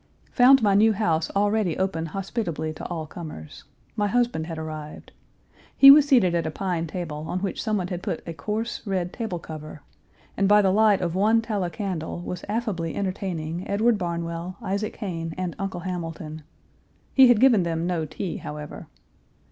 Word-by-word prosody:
Found 255 0 +6
my 205 -2 +4
new 215 +2 +5
house 165 -6 0
already 205 -4 +1
open 185 -4 -1
hospitably 175 -3 -3
to 155 - -9
all 165 -3 -4
comers. 155 - -9 0.3
My 205 -1 +1
husband 235 -8 0
had 165 -2 -5
arrived. 155 -1 -7 0.7
He 275 0 +11
was 290 0 +7
seated 235 - +4
at 165 -2 0
a - - -1
pine 170 0 -2
table, 155 -3 -5
on 180 - -2
which 195 -2 -3
someone 200 -5 -1
had 180 -1 -4
put 165 - -4
a 165 - -4
coarse, 215 +7 -3
red 185 -2 -2
table 220 -7 -3
cover, 155 -2 -9 0.5
and 195 - +2
by 210 0 +6
the 190 - +3
light 210 -1 +4
of 170 -2 -1
one 215 +5 +3
tallow 210 -6 -2
candle 175 -2 -4
was 180 0 -6
affably 205 -7 -2
entertaining 185 -3 -3
Edward 215 +2 +2
Barnwell, 170 +1 -4
Isaac 200 0 -3
Hayne, 165 -5 -5
and 180 -2 -3
Uncle 195 -3 -4
Hamilton. 165 -3 -5 0.7
He 265 -1 +8
had 245 -3 +5
given 240 -5 +5
them 165 -1 -1
no 175 -3 -1
tea, 175 +4 -5
however. 150 0 -8
180 Hz, 170 wpm, -25 LUFS, 165-210 Hz, 0.7 s, He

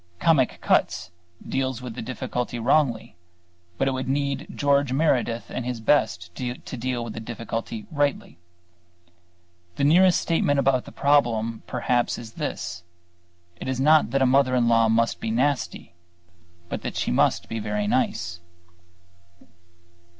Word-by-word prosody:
"Comic 145 -7 +3
Cuts" 90 +3 +1 0.4
deals 130 -2 -1
with 125 -2 -7
the - - -6
difficulty 125 0 -4
wrongly, 120 -2 +1 0.6
but 135 - +1
it - - +2
would 130 -1 -3
need 140 0 -1
George 140 -2 +2
Meredith 130 -5 0
at 125 - -3
his 125 -1 -4
best 110 -8 +1
to 125 +5 -4 0.2
deal 125 0 -2
with 115 -2 -6
the - - -6
difficulty 115 -1 -5
rightly. 145 - -1 1.4
The - - -2
nearest 175 +5 +5
statement 155 -4 +1
of 135 -2 +2
the - - -10
problem 115 -6 +1
perhaps 125 -1 0
is 115 -1 -9
this: 90 - -4 0.8
it - - -6
is 130 -1 -2
not 155 +3 +5
that 135 -1 +2
a - - +4
mother 130 0 +3
in 120 -2 +2
law 115 -1 +4
must 115 +1 +1
be - - -3
nasty, 130 0 -1 0.7
but - - -4
that - - -5
she - - -1
must - - +2
be 115 - -4
very 105 -1 -2
nice. 90 -7 -1
125 Hz, 145 wpm, -24 LUFS, 115-140 Hz, 1.4 s, nearest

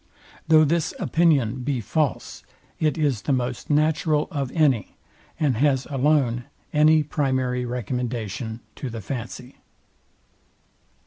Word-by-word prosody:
Though 155 -1 +6
this 160 +1 0
opinion 140 -8 +2
be 135 0 -1
false, 140 +6 -2 0.4
it 155 0 +1
is 140 -9 +1
the - - -2
most 125 -2 -2
natural 155 0 +2
of 140 -4 -3
any, 140 - +1 0.4
and 140 -7 +1
has 135 0 +2
alone 135 -4 +1 0.3
any 155 +1 +5
primary 130 -4 -1
recommendation 120 -2 -4 0.2
to 135 - -4
the 115 -1 -6
fancy. 125 +3 -7
135 Hz, 115 wpm, -24 LUFS, 125-150 Hz, 0.4 s, Though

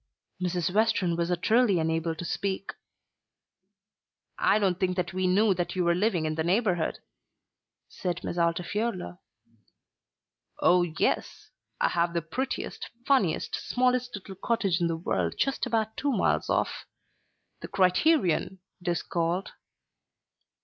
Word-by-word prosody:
Mrs. 180 -1 -1
Western 215 -5 +2
was 170 0 -1
utterly 205 +4 +3
unable 160 0 0
to 175 - -6
speak. 195 +2 -2 1.7
"I - - +4
don't 190 -4 +1
think 185 -1 0
that 180 0 -1
we 185 0 0
knew 200 +3 +4
that 175 0 -3
you 185 - +1
were 170 0 +3
living 180 -3 +1
in 155 - -1
the 160 0 -1
neighbourhood," 180 -2 +1 0.9
said 180 -1 -4
Miss - - -3
Altifiorla. 175 - -1 1.4
"Oh, 180 0 +5
yes; 170 -2 -1 0.3
I - - +3
have 170 0 0
the 170 - 0
prettiest, 260 +12 -4 0.2
funniest, 210 - +2
smallest 250 -1 0
little 195 -1 -8
cottage 195 -3 0
in 170 - +3
the 165 -1 -1
world 90 - -1
just 275 -1 0
about 220 -2 -1
two 285 - 0
miles - - +1
off. - - -1 0.7
The - - -7
Criterion 190 - +2 0.2
it 180 - -11
is 175 -1 0
called." 175 +3 -1
180 Hz, 135 wpm, -28 LUFS, 170-215 Hz, 1.7 s, Oh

